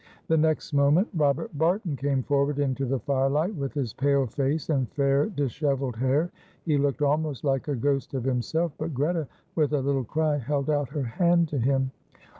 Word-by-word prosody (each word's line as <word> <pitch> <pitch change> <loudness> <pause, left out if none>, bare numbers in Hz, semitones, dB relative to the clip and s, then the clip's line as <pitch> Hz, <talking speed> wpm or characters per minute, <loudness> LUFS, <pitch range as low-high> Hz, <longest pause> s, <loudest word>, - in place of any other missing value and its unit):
The 160 - +4
next 155 -1 +1
moment 145 +8 +4
Robert 145 -1 0
Barton 170 +2 +1
came 135 0 0
forward 140 +1 +1
into 135 -1 0
the 135 +2 0
firelight, 140 - 0
with 140 -4 -4
his 130 -6 -2
pale 140 0 +2
face 140 +6 -1
and 130 -6 0
fair, 140 0 +2
dishevelled 140 - -1
hair. 135 +7 +1 0.3
He 155 -3 +2
looked 145 +1 0
almost 145 -2 0
like 135 -1 0
a 145 - 0
ghost 135 +2 -1
of 130 - -2
himself, 135 +6 0
but 155 -2 -3
Greta, 155 +3 0 0.3
with 150 -2 +1
a 145 - +3
little 135 0 0
cry, 155 +4 0
held 140 +2 -1
out 145 -3 0
her 145 -1 -3
hand 170 +7 +2
to 145 - -2
him. 135 +1 +1
140 Hz, 185 wpm, -26 LUFS, 135-155 Hz, 0.3 s, The